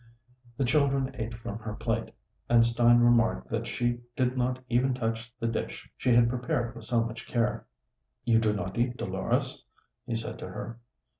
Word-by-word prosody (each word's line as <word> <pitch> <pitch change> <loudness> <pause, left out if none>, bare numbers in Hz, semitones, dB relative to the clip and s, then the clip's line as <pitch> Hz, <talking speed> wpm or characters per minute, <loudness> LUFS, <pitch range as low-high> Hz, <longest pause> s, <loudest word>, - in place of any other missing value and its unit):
The 135 - +1
children 135 -1 +2
ate 115 -2 -4
from 115 -2 -6
her 105 -2 -5
plate, 115 0 -2 0.4
and 115 -1 +6
Stein 120 0 +5
remarked 115 - +3
that - - -1
she 120 0 0 0.2
did 125 0 +1
not 125 0 0
even 125 +1 +2
touch 115 -1 -3
the 115 - -2
dish 115 - -4
she 125 - +1
had 120 0 +6
prepared 120 -1 -1
with 115 -2 -8
so 115 -1 +2
much 115 +1 -6
care. 115 -2 0 0.6
"You 115 -2 +5
do 110 -1 +2
not 100 0 -3
eat, 120 +1 +1
Dolores?" - - -1 0.4
he 115 - -1
said 115 +1 -2
to - - -6
her. 115 +5 -7
120 Hz, 175 wpm, -29 LUFS, 115-125 Hz, 0.6 s, and